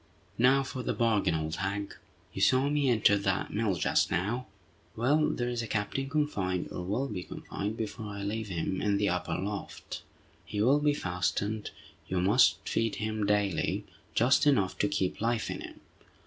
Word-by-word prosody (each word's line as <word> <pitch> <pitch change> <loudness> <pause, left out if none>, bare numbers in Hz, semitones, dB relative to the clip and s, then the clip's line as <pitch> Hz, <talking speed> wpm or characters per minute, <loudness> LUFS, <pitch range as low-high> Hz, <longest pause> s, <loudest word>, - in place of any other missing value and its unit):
"Now 130 +3 +5
for 130 -1 -5
the - - -2
bargain, 105 -7 +2
old 80 0 -2
hag. 100 +2 -2 0.4
You - - -4
saw 130 +2 +4
me 145 -2 +2
enter 105 -3 +4
that 95 -1 -1
mill 105 -3 +1
just 85 - +2
now? 110 +8 -1 0.5
Well, 145 +7 +3
there 120 - -1
is 120 -1 -1
a 115 - -4
captain 110 +6 -2
confined, 105 - -1
or 90 - -4
will 105 +10 -1
be 100 -6 -4
confined 105 +4 -5
before 110 0 -4
I 100 -1 -5
leave 110 +2 -2
him, 95 0 -2
in 100 -1 +2
the 100 0 +2
upper 90 -2 -1
loft. 100 +1 -5 0.4
He 90 +5 -5
will 130 +7 +4
be 145 0 +2
fastened. 90 - -1 0.4
You 95 - 0
must 100 +8 +4
feed 115 -1 0
him 110 -1 -2
daily, 100 -3 +1 0.3
just 130 +5 +4
enough 100 -10 +3
to 105 - +3
keep 95 -1 -1
life 115 0 0
in - - -5
him. - - -10
105 Hz, 175 wpm, -30 LUFS, 95-120 Hz, 0.5 s, Now